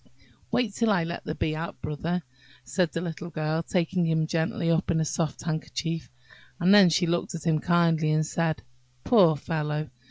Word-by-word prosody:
"Wait 235 -5 0
till 230 +2 +1
I 195 -5 +3
let 170 +1 -5
the 155 - -3
Bee 155 - -1
out, 165 +2 -5
Brother," 165 +4 -3 0.4
said 180 -4 0
the 165 - -3
little 170 0 -5
Girl, 155 0 -1
taking 175 0 0
him 160 -1 +1
gently 165 +3 0
up 165 +2 +1
in 165 - +2
a 160 - +1
soft 155 -1 -2
handkerchief; 160 0 -3 0.5
and 180 +3 +5
then 200 -3 +8
she 175 +2 +2
looked 170 +1 -1
at 165 - -7
him 160 -2 +2
kindly 165 -2 +2
and 155 0 +2
said, 160 -1 -1 0.4
"Poor 180 -9 +5
fellow! 150 0 -3
165 Hz, 185 wpm, -27 LUFS, 155-175 Hz, 0.5 s, then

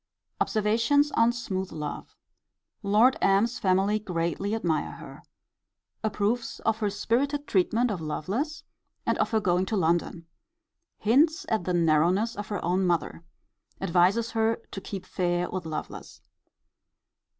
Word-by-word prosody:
Observations 230 +7 +2
on 230 +1 +3
smooth 190 -6 -4
love. 150 -2 -6 0.7
Lord 215 +5 +4
M.'s 205 +5 +2
family 195 +3 +2
greatly 180 +1 -2
admire 170 -8 -1
her. - - -11 0.8
Approves 220 +2 -1
of 225 0 0
her 210 -2 0
spirited 270 +8 -1
treatment 220 +4 +1
of 185 -5 -4
Lovelace, 200 - -3 0.4
and - - +1
of - - +1
her 220 - +2
going 185 -1 +1
to 220 - -1
London. 170 -1 0 0.7
Hints 305 - +3
at 220 -6 0
the 180 - -1
narrowness 175 +7 +2
of 205 -1 -6
her 205 -5 -4
own 180 +2 +1
mother. 170 -1 -1 0.6
Advises 195 +5 +2
her 225 0 +1 0.2
to 195 - -6
keep 190 -1 -7
fair 175 -1 -1
with 185 -3 -4
Lovelace. 155 - -7
200 Hz, 130 wpm, -27 LUFS, 180-230 Hz, 0.8 s, Lord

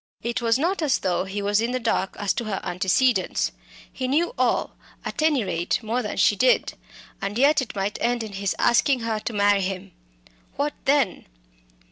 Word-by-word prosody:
It 235 +2 -2
was 230 0 +2
not 345 +6 0
as 295 -4 +2
though 180 0 -1
he 200 +1 -4
were 205 +1 -1
in 235 +2 -1
the 255 - 0
dark 225 -5 -1
as 205 -2 0
to 235 - -3
her 200 -3 -2
antecedents. 190 +4 +1 0.4
He 255 - -3
knew 325 - +1
all - - 0 0.3
at - - -3
any 300 -6 +3
rate, 175 -3 -1
more 230 +3 -1
than 210 - -5
she 205 - +4
did 255 +6 +2 0.5
and 200 +1 -3
yet 285 +3 +4
it 255 - -6
might 200 +1 -2
end 240 0 0
in 215 -2 -8
his 195 0 -2
asking 250 +2 +3
her 225 -1 -1
to 225 - -5
marry 205 -1 +3
him. 190 0 -4 0.6
What 290 +1 -1
then? 270 -8 +1
225 Hz, 190 wpm, -24 LUFS, 195-255 Hz, 0.6 s, she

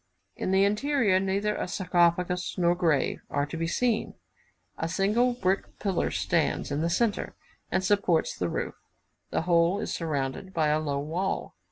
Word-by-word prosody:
In - - -3
the 190 +1 +4
interior, 210 -1 +2
neither 200 +2 0
a - - -3
sarcophagus 180 -1 +1
nor 175 -1 +3
grave 165 -5 +1
are 145 0 0
to 145 - -7
be 165 0 -1
seen; 230 +5 0 0.6
a 165 - -3
single 210 +7 +2
brick 195 -5 -1
pillar 195 -4 0
stands 165 -4 0
in 145 +2 -1
the 165 - +1
centre, 215 +4 0 0.3
and 185 - 0
supports 190 -4 +2
the 90 - -2
roof. - - -3 0.6
The - - -1
whole 170 +2 +3
is 180 - -3
surrounded 155 +2 -3
by 155 -2 +2
a 150 +1 +2
low 145 -3 -2
wall. 165 +7 -2
180 Hz, 165 wpm, -27 LUFS, 165-200 Hz, 0.6 s, the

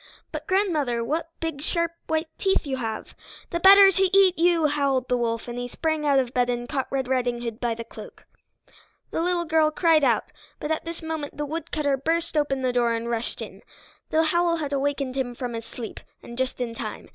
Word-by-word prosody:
"But, - - -6
grandmother, 310 - +1
what 315 +7 -2
big 325 -4 -3
sharp 335 +2 0 0.2
white 320 0 0
teeth 385 -4 +1
you 270 -2 -2
have!" 225 -3 -5 0.4
"+The 340 - -1
better 390 +2 +9
to 385 +1 +2
eat 380 -2 +6
you!+" 335 -1 +3
howled 280 -3 +1
the 250 - +2
wolf, 230 -1 -1
and 240 0 -5
he 245 - -3
sprang 315 +3 -1
out 280 -1 +4
of 255 -2 +1
bed 245 -1 +2
and 240 0 -2
caught 270 -1 -2
Red 265 -2 -1
Riding 245 -2 0
Hood 230 -1 -5
by 235 -2 -1
the 230 - -6
cloak. 230 - -12 0.9
The - - -1
little 350 0 0
girl 315 -1 +3
cried 315 -1 +3
out, 235 -5 +2 0.3
but 300 - -3
at 315 - -1
this 335 0 -6
moment 315 -3 -4
the 295 - -2
woodcutter 300 -2 -1
burst 325 +4 -1
open 275 -3 +1
the 250 -1 +1
door 240 -1 +2
and 230 +1 -3
rushed 230 0 -2
in. - - -10 0.5
The 320 +1 +3
howl 340 +1 +2
had 295 -4 -3
awakened 275 -1 -1
him 250 -3 -2
from 245 -1 -4
his 230 0 -5
sleep, 230 -2 -7 0.2
and 235 - -9
just 260 +1 -2
in 240 -2 -2
time. - - -6
285 Hz, 215 wpm, -25 LUFS, 245-325 Hz, 0.9 s, better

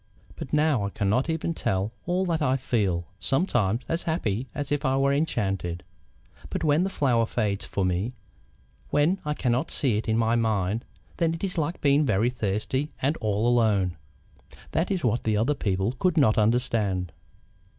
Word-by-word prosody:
But - - -7
now 150 -6 +2
I 100 - -1
cannot 105 +9 0
even 165 +1 -1
tell 95 -7 -1 0.2
all 180 +2 +1
that 165 -3 -1
I 135 -3 +2
feel 100 -10 0
sometimes 120 - +1
as 165 +1 -1
happy 130 - -1
as 145 -1 -3
if 145 - 0
I 130 0 +2
were 140 0 +3
enchanted. 95 - -1 0.7
But - - -3
when 155 +2 +3
the 190 - 0
flower 120 -10 +1
fades 105 -5 -1
from 95 -2 -1
me, 95 +8 -1 0.8
when 165 +7 +2
I 150 0 -1
cannot 125 -1 0
see 125 -8 +1
it - - -6
in 110 0 +2
my 115 0 +2
mind, 110 -1 0 0.3
then 165 -1 +1
it 165 - -9
is 190 -2 -1
like 165 +1 -2
being 140 +1 +4
very 120 -2 +2
thirsty 110 +5 -2
and 140 +4 +1
all 110 +1 0
alone. 105 -7 +2 0.8
That 165 - 0
is 190 -4 -1
what 120 -1 +1
the 110 -1 +1
other 120 +8 +2
people 100 -5 -1
could 180 +8 0
not 120 -8 +5
understand. 105 -5 +1
120 Hz, 175 wpm, -26 LUFS, 105-150 Hz, 0.8 s, not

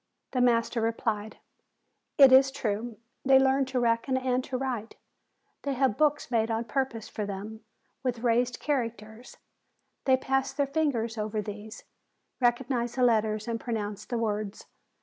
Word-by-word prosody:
The 250 - 0
master 235 -1 +2
replied: 220 -1 -2 0.8
"It 275 -2 +9
is 265 +1 +7
true. 225 -3 -3 0.3
They 270 0 +6
learn 265 0 +3
to 260 -1 -2
reckon 235 +2 +1
and 255 -1 0
to 260 - -3
write. 245 -4 -4 0.7
They 280 - -2
have 260 -4 +2
books 295 -2 +1
made 225 -1 +2
on 225 0 0
pur 265 +4 0
pose 225 -4 -9
for 215 - -5
them, 205 +3 -6 0.4
with 245 -3 -2
raised 245 +1 +1
characters; 230 -4 -4 0.7
they 260 -1 +5
pass 270 0 -1
their 285 - +1
fingers 265 -7 -1
over 215 0 -2
these, 210 +1 -7 0.6
recognize 240 -1 0
the 255 - +1
letters 215 -2 +2
and 230 -1 -2
pronounce 210 -4 -4
the 240 - -3
words. 215 -2 -3
235 Hz, 150 wpm, -28 LUFS, 220-260 Hz, 0.8 s, It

